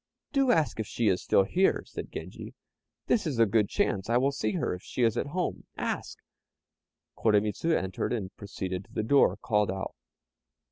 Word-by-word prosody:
"Do 275 -2 +3
ask 160 - +1
if 110 - -2
she 115 -3 +1
is 95 - +1
still 100 - +4
here," 185 - +2
said - - -7
Genji; - - -8 0.5
"this 215 -7 +1
is 140 -6 -2
a 115 - +6
good 105 -1 +2
chance; 95 +2 0
I 120 - +4
will 135 +3 +2
see 110 -6 -1
her - - -1
if 90 - -7
she 125 - -2
is 115 -1 +3
at 120 - -1
home 180 +5 -3
ask!" - - -3 1.0
Koremitz 105 -2 +1
entered, 125 - 0
and 105 -6 -3
proceeding 95 -3 -5
to - - -20
the 110 - -2
door, 140 +5 +4
called 105 -4 +1
out. 95 0 -3
110 Hz, 185 wpm, -29 LUFS, 100-140 Hz, 1.0 s, a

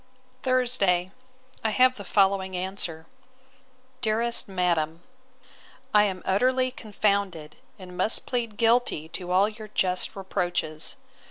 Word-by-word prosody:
Thursday. 240 -9 +1 0.5
I 220 - +2
have 255 +4 +4
the 200 - -8
following 190 -1 +2
answer: 180 -3 -3 1.0
'DEAREST 230 +2 +2
MADAM, 170 -3 0 0.9
'I 210 0 +7
am 190 -3 -3
utterly 255 +6 +2
confounded, 200 -9 -1 0.2
and 180 -2 -11
must 215 - +2
plead 230 -4 -2
guilty 230 -9 +2
to 180 +2 -6
all 190 +3 +4
your 215 0 -8
just 185 -3 -1
reproaches. 175 -5 -3
195 Hz, 110 wpm, -26 LUFS, 180-225 Hz, 1.0 s, I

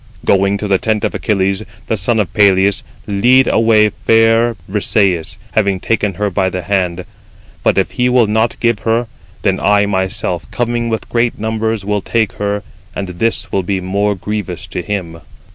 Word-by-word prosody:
"Going 100 +1 +3
to 105 - -4
the 95 -2 +2
tent 110 -2 -1
of - - -2
Achilles, 95 -2 0 0.2
the - - -1
son 110 +3 0
of 100 -5 -1
Peleus, 100 -1 +4 0.2
lead 125 +6 +4
away 110 -1 +4
fair 115 +2 +3
Brisëis, 95 -4 0
having 100 -3 +1
taken 105 -2 -1
her 105 +1 -1
by 95 0 +1
the 90 -1 -4
hand; 90 -2 -1 0.6
but - - +2
if - - +1
he 125 0 +1
will 125 -2 +4
not 110 +2 0
give 115 -3 +1
her, 115 +3 0 0.4
then 95 -2 +1
I 100 0 +3
myself, 95 -3 -2
coming 120 -1 -1
with 110 -1 -3
great 120 0 0
numbers, 110 -1 -2
will 105 0 0
take 110 0 0
her, 100 0 -1 0.3
and 95 -2 -4
this 110 +6 -1
will 95 - +1
be 95 +1 -2
more 100 +3 0
grievous 105 +1 -4
41 - - -18 0.2
to - - -5
him." 85 -5 -4
105 Hz, 180 wpm, -16 LUFS, 95-110 Hz, 0.6 s, Peleus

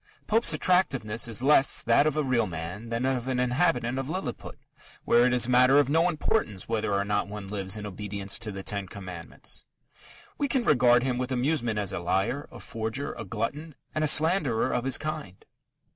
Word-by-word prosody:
Pope's 225 +2 +3
attractiveness 135 - +1
is 115 +1 -4
less 140 -1 +5
that 120 +6 +4
of 155 0 -1
a 155 - +2
real 125 -5 +1
man 90 +6 -6
than 115 +2 -1
of 130 -2 -1
an 130 -1 -1
inhabitant 125 -1 +1
of 135 +1 -4
Lilliput, 160 -8 -5 0.5
where 120 +1 +5
it - - +1
is 125 -1 +4
a - - -5
matter 130 +2 +5
of 145 -2 +4
no 165 +4 +3
importance 150 - -1
whether 110 -2 -1
or 100 0 0
not 105 0 0
one 105 -1 -7
lives 100 0 -3
in 105 - -6
obedience 100 0 -5
to 110 -2 -5
the 95 -1 -7
Ten 100 -1 -3
Commandments. 90 -4 -8 0.8
We 285 - +1
can 265 -2 0
regard 125 - +4
him 125 -2 -1
with 130 +1 -3
amusement 125 -3 0
as 100 -2 -2
a - - -2
liar, 95 +11 -1
a - - -11
forger, 115 +5 -4
a - - -7
glutton, 145 +8 -4 0.2
and 155 - -1
a - - +2
slanderer 155 -7 +3
of 125 +1 -1
his 135 - +2
kind. 100 - -6
120 Hz, 200 wpm, -27 LUFS, 105-145 Hz, 0.8 s, less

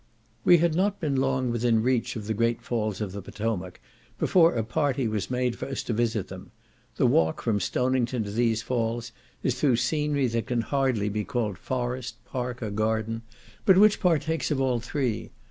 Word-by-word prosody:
We 175 - +7
had 170 0 +2
not 195 +4 +1
been 145 -6 0
long 130 -2 +1
within 115 -1 +2
reach 125 -1 0
of 110 -3 -5
the 110 - -1
great 115 +2 0
falls 110 -4 -2
of 105 -3 -2
the 100 +1 -6
Potomac 95 -2 -4 0.4
before 170 -5 +4
a 115 - 0
party 130 +2 0
was 110 -3 -2
made 125 -1 0
for - - -6
us 135 - -3
to 120 - -2
visit 110 -3 0
them; - - -10 0.5
the - - +2
walk 80 0 +2
from 110 -3 +1
Stonington 125 +3 0
to 100 - -6
these 110 0 +1
falls 120 -1 -2 0.3
is 130 -1 0
through 135 -5 +4
scenery 145 +3 +1
that 115 -2 -1
can 120 -2 0
hardly 130 -5 0
be 105 +1 -2
called 105 -5 -2
forest, 125 -2 -3
park, 125 -1 -4
or 105 - -3
garden; 110 +2 -1 0.4
but 190 -2 +6
which 210 +1 +6
partakes 160 -3 +1
of 145 -3 0
all 130 -3 +1
three. 125 -1 -2
120 Hz, 190 wpm, -26 LUFS, 110-135 Hz, 0.5 s, We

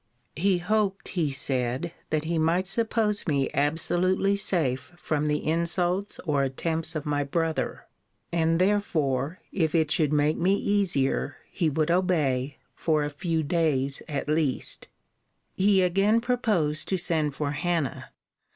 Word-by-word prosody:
He 190 +2 +2
hoped, 200 +1 -1
he 165 -5 0
said, 135 +3 -2 0.2
that 155 -1 0
he 165 0 -1
might 170 +4 +2
suppose 215 0 +1
me 140 -3 +1
absolutely 175 +6 +1
safe 160 -10 0
from 150 -3 -1
the 150 0 -1
insults 175 +4 0
or 145 -4 +1
attempts 160 +4 -1
of 155 - -3
my 145 -1 0
brother; 160 +3 -2 0.5
and, 165 -1 +2
therefore, 165 -7 0
if 160 -3 0
it 160 -2 +2
should 155 -4 +3
make 150 +1 +2
me 185 +3 +2
easier, 195 -10 0
he 170 -4 0
would 155 +2 0
obey, 150 -7 +1 0.2
for 155 -2 0
a 145 - -3
few 160 +2 -1
days 145 -4 0
at 145 -2 -3
least. 150 -3 0 0.7
He 195 -1 +3
again 195 +5 +3
proposed 215 -11 0
to 190 - 0
send 155 -5 +1
for 145 -1 -2
Hannah. 165 -2 -2
165 Hz, 140 wpm, -26 LUFS, 145-185 Hz, 0.7 s, should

